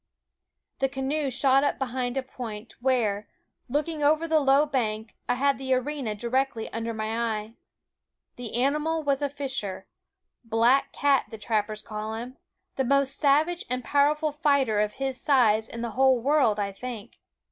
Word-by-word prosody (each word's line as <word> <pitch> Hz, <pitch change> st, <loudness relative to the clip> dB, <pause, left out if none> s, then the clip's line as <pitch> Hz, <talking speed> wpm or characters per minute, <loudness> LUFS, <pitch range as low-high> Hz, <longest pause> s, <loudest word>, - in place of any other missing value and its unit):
The 270 Hz, -, +1 dB
canoe 275 Hz, +2 st, -1 dB
shot 265 Hz, +1 st, +3 dB
up 285 Hz, -, 0 dB
behind 255 Hz, -1 st, -2 dB
a 265 Hz, -, 0 dB
point, 230 Hz, -4 st, -8 dB
where, 225 Hz, -6 st, +1 dB, 0.4 s
looking 300 Hz, +3 st, -1 dB
over 310 Hz, +3 st, +3 dB
the 320 Hz, -1 st, +3 dB
low 280 Hz, +1 st, +4 dB
bank, 220 Hz, -6 st, -2 dB, 0.2 s
I -, -, +3 dB
had 275 Hz, +2 st, +1 dB
the 260 Hz, -1 st, +1 dB
arena 255 Hz, -4 st, -2 dB
directly 240 Hz, +1 st, -1 dB
under 230 Hz, 0 st, -3 dB
my 220 Hz, +1 st, -3 dB, 0.2 s
eye. 210 Hz, +1 st, -8 dB, 0.8 s
The 240 Hz, -3 st, -6 dB
animal 300 Hz, +5 st, +1 dB
was 280 Hz, -1 st, +1 dB
a 285 Hz, -, 0 dB
fisher 265 Hz, -10 st, -4 dB, 0.6 s
black 230 Hz, +4 st, +3 dB
cat 280 Hz, -2 st, +2 dB
the 220 Hz, -, -8 dB
trappers 215 Hz, 0 st, -2 dB
call 215 Hz, 0 st, -5 dB
him 245 Hz, +3 st, -7 dB, 0.4 s
the 265 Hz, -, +2 dB
most 275 Hz, +1 st, +2 dB
savage 310 Hz, +5 st, +2 dB
and 250 Hz, 0 st, -2 dB
powerful 300 Hz, +3 st, +2 dB
fighter 280 Hz, -7 st, +2 dB
of 210 Hz, 0 st, 0 dB
his 265 Hz, -1 st, -3 dB
size 225 Hz, -6 st, +3 dB
in 230 Hz, 0 st, -6 dB
the 235 Hz, -, -3 dB
whole 260 Hz, +1 st, +4 dB
world, 260 Hz, -5 st, +2 dB
I 200 Hz, -1 st, -1 dB
think. 235 Hz, +1 st, -8 dB
260 Hz, 160 wpm, -26 LUFS, 225-280 Hz, 0.8 s, low